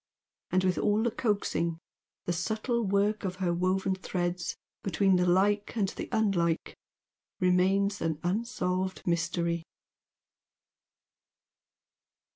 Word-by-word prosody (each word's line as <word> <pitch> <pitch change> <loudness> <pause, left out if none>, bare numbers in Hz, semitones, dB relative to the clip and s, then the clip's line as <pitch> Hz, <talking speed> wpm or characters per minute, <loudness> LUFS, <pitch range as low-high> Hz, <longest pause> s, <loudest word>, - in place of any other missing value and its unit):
And 185 0 +2
with 185 -1 +1
all 210 +1 +2
the 235 - +1
coaxing, 200 -7 0 0.5
the 175 - 0
subtle 220 +7 -1
work 200 +2 +1
of 185 -2 -2
her 180 -2 0
woven 185 +2 +1
threads 175 -2 -2 0.2
between 195 0 +2
the 180 0 +2
Like 200 +3 +2
and 200 -3 +2
the - - -6
Unlike 195 -7 +1 0.6
remains 190 +3 +2
an 160 -2 0
unsolved 185 -2 -1
mystery. 170 -1 0
185 Hz, 105 wpm, -29 LUFS, 175-205 Hz, 0.6 s, And